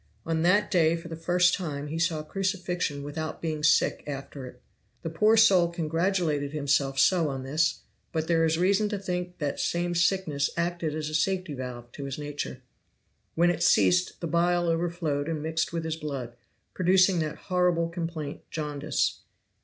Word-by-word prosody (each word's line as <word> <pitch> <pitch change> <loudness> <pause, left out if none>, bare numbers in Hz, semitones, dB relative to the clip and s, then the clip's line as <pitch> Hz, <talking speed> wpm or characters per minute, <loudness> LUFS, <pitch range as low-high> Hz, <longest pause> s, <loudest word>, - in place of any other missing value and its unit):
On 165 -1 0
that 200 +5 +3
day 165 -3 +4
for 170 0 -8
the 165 - -5
first 175 +2 +2
time 150 -6 -3
he 155 +2 -4
saw 165 -2 +1
a - - -10
crucifixion 180 -4 -2
without 155 +2 -5
being 155 -2 -3
sick 155 - +3
after 140 -1 -6
it. 125 0 -13 0.4
The 165 - -3
poor 215 +7 +4
soul 185 -5 +6
congratulated 165 -3 -1
himself 140 -2 +1
so 165 +1 +4
on 135 -1 -4
this; 150 +4 0 0.3
but 160 -2 -1
there 165 -1 +3
is 160 0 +2
reason 200 +4 +2
to 205 - -2
think 180 -2 -4
that 145 -3 -3
same 175 0 0
sickness 170 -5 +1
acted 170 -2 -1
as 155 -1 -3
a - - -8
safety 185 0 0
valve 125 -2 -7
to 140 - -7
his 135 -1 -5
nature; 145 -3 -5 0.7
when 175 +1 +4
it 170 -1 -4
ceased 180 +1 +3
the - - -2
bile 175 +1 +2
overflowed 165 -3 -1
and 155 -2 -3
mixed 160 0 -1
with 165 -1 -3
his 160 0 -2
blood, 140 -6 -5 0.4
producing 185 0 +4
that 155 -2 -2
horrible 180 -3 +1
complaint 165 -3 -5
jaundice. 150 -1 -2
165 Hz, 175 wpm, -27 LUFS, 150-175 Hz, 0.7 s, soul